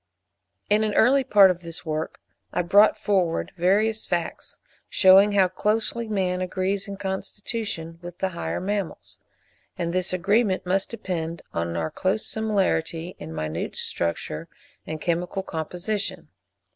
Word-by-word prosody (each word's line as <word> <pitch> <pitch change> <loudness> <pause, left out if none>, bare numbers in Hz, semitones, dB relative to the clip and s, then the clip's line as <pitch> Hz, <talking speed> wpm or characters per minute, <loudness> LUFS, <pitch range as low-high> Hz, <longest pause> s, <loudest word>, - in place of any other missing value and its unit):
In 210 +1 +3
an 215 -1 -1
early 270 +4 +5
part 205 -7 +7
of 175 -1 -5
this 170 0 -7
work 155 0 -3 0.3
I 175 - 0
brought 205 +5 +5
forward 185 -5 0
various 210 +5 +2
facts, 170 -1 -3 0.3
shewing 195 +1 +6
how 195 -2 +5
closely 220 +4 0
man 185 -3 0
agrees 190 +2 -1
in 200 0 -6
constitution 190 -3 -4
with 175 0 -9
the 190 - 0
higher 170 -2 -3
mammals; 200 -1 -4 0.6
and 170 -1 -2
this 185 0 +1
agreement 195 +2 +1
must 190 +2 +1
depend 170 -7 -4
on 85 0 -2
our 80 -1 -2
close 195 +3 0
similarity 185 -6 -1
in 80 - -7
minute 80 +1 -3
structure 85 -2 -3 0.4
and 155 0 -4
chemical 175 +4 -1
composition. 180 +6 -3
185 Hz, 135 wpm, -25 LUFS, 170-205 Hz, 0.6 s, part